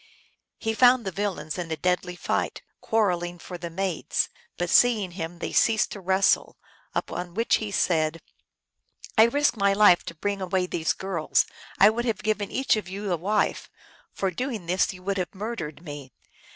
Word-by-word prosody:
He 225 -1 -2
found 245 0 +5
the 190 - -2
villains 185 -4 -3
in 170 -2 -4
a 160 - -2
deadly 180 +2 0
fight, - - -2 0.2
quarrel 205 -6 +1
ing 175 0 -5
for 175 +1 -9
the 170 0 -5
maids; 185 0 -1 0.3
but 175 - -1
seeing 215 -6 +4
him 170 -1 -6
they - - -4
ceased 225 -2 +3
to 205 - -6
wrestle, 190 +1 +2 0.4
upon 175 0 -3
which 230 +2 +2
he 215 - -4
said, 165 -4 +1 0.5
" - - -20
I 220 - +9
risked 285 -1 +1
rny 200 0 +3
life 205 -4 +6
to 170 - -7
bring 200 +4 -2
away 185 0 0
these 165 -3 -1
girls; 190 -5 0 0.3
I 205 +2 +7
would 240 +2 -2
have 230 -3 -2
given 215 -2 0
each 265 -2 +2
of 205 -4 -5
you 200 +1 -4
a - - +3
wife: 200 +6 0 0.4
for 195 -1 -2
doing 225 -1 -4
this 180 +2 +1
you 180 -1 -12
would 200 0 -1
have 180 +2 -4
murdered 185 -7 -5
me. 145 -4 -8
190 Hz, 185 wpm, -26 LUFS, 175-215 Hz, 0.5 s, I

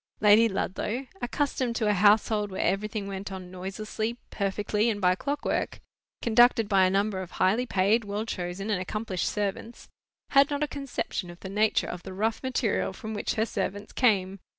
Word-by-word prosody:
Lady 215 +2 +6
Ludlow, 210 +6 -2 0.2
accustomed 255 -2 -1
to 220 - 0
a 210 - +4
household 210 +1 +3
where 190 - -2
everything 205 +1 -1
went 195 0 -5
on 185 -1 -7
noiselessly, 215 +5 -4
perfectly, 210 +2 0
and 210 -2 -1
by 180 -2 +4
clockwork, 285 +9 -2 0.4
conducted 235 -1 +5
by 195 -2 +4
a - - +3
number 195 0 0
of 185 - -7
highly 220 +7 +2
paid, 205 +4 +2
well 205 +2 -3
chosen, 185 +1 -4
and 190 -3 0
accomplished 195 -1 -2
servants, 210 +3 -4 0.4
had 275 0 +5
not 290 0 -1
a - - 0
conception 275 -10 -4
of 175 0 -11
the 190 - -6
nature 210 +2 +2
of 180 - -6
the 185 - -8
rough 220 +4 -1
material 250 -7 0
from 220 +3 -7
which 205 - -2
her 220 - +2
servants 205 -1 -4
came. 195 -6 +2
210 Hz, 175 wpm, -27 LUFS, 190-225 Hz, 0.4 s, Lady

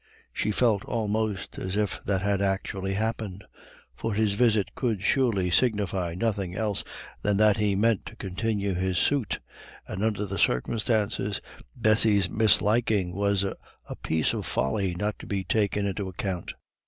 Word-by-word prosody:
She - - -1
felt 105 -2 +2
almost 110 -3 -2
as 95 +1 -3
if 105 -2 -1
that 95 -1 0
had 100 -1 +1
actually 95 0 -1
happened. 110 -2 -3 0.5
For 115 -2 -3
his 110 -1 +2
visit 110 -3 +2
could 110 -7 -1
surely 100 -7 +2
signify 95 -6 +1
nothing 100 -3 -1
else 105 -1 -1 0.4
than 105 -1 +1
that 105 -1 +5
he 105 -2 +1
meant 110 +1 +2
to 110 - -9
continue 100 0 -2
his 90 0 -1
suit; 135 -6 +1 0.5
and 95 - -4
under 105 -2 0
the 100 -2 -4
circumstances, 105 - +1 0.4
Bessy's 110 -4 +4
misliking 105 -2 +2
was 100 0 +1
a 100 - -2 0.5
piece 80 -1 +1
of - - -3
folly 85 +8 0
not 105 +3 -2
to - - -10
be 100 -2 -1
taken 100 +2 +1
into 100 0 -2
account. 95 -1 -4
100 Hz, 150 wpm, -27 LUFS, 95-110 Hz, 0.5 s, that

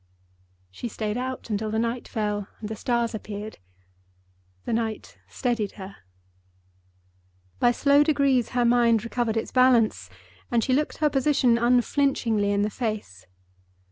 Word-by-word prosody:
She 165 - -6
stayed 215 -1 -3
out 255 -1 -5
until 215 +1 -1
the 220 - -2
night 235 +2 -2
fell 210 -2 -2
and 210 - -6
the 220 - -4
stars 235 +1 -1
appeared. 210 0 -7 1.1
The - - -2
night 225 -1 -3
steadied 235 -6 -2
her. 195 -1 -10 1.6
By 245 - +4
slow 280 +3 +4
degrees 280 -5 +2
her 245 - +3
mind 235 -2 +3
recovered 235 -1 -1
its 225 - -3
balance 235 - +3 0.4
and 235 -2 +1
she 260 - 0
looked 295 +3 0
her 305 -1 +2
position 265 -4 +2
unflinchingly 240 -3 +1
in 200 0 +1
the 210 - -1
face. 205 - -5
230 Hz, 140 wpm, -25 LUFS, 215-250 Hz, 1.6 s, By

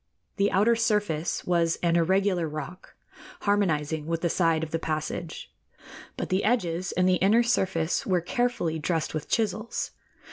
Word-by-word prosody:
The 200 0 +2
outer 210 +5 +4
surface 210 -8 0
was 170 -2 +1
an 170 -1 +3
irregular 180 0 +2
rock, 155 +4 -8 0.5
harmonizing 160 -7 0
with 165 0 -1
the 170 - +1
side 165 -3 +2
of 160 - -5
the 165 - -1
passage, 155 +1 -4 0.6
but - - -3
the 185 +1 +1
edges 185 -6 0
and 185 +1 +2
the 185 0 +4
inner 215 +6 +4
surface 190 -8 0
were 185 -2 +1
carefully 180 -4 -1
dressed 160 +1 -1
with 155 -2 -4
chisels. 215 0 -1
175 Hz, 150 wpm, -27 LUFS, 165-200 Hz, 0.6 s, outer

